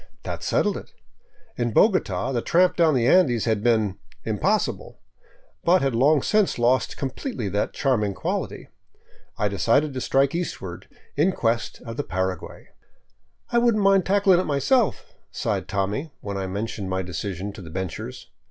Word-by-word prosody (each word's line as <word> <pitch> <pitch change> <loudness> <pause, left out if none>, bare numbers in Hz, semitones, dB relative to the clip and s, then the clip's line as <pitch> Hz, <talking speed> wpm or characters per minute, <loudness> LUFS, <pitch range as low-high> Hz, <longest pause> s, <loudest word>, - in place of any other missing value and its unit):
That - - -5
settled - - +1
it. - - -10 0.7
In 120 -2 -1
Bogota 190 - +2
the 120 -3 0
tramp 180 +6 +3
down 165 -4 +3
the 120 -2 +2
Andes 130 - +4
had 110 -3 +1
been 110 -4 +1
" - - -28
impossible," - - -1 0.6
but 180 0 +4
had 135 -2 +1
long 140 +4 +3
since 210 -2 +2
lost 125 +2 +1
completely 135 - -4
that 100 +2 -1
charming 105 -8 0
quality. - - -4 0.7
I 105 - +1
decided 115 - +1
to 130 - -4
strike 135 +2 +2
eastward 95 - -5 0.3
in 170 +7 +2
quest 115 -4 -1
of 115 0 -7
the 145 - -1
Paraguay. 95 -3 -4 0.4
" - - -37
I 240 - +4
wouldn't 235 -3 +2
mind 195 -1 +5
tackling 195 -2 +4
it 185 - -1
myself," 210 - +1 0.2
sighed - - -2
Tommy, 105 +11 -2
when 100 -1 -5
I 95 -1 -3
men 100 +4 -2
tioned 105 -3 -6
my 95 0 -1
decision 95 +2 -5
to 100 - -10
the 85 - -10
benchers. 105 +8 -5
120 Hz, 165 wpm, -24 LUFS, 100-170 Hz, 0.7 s, mind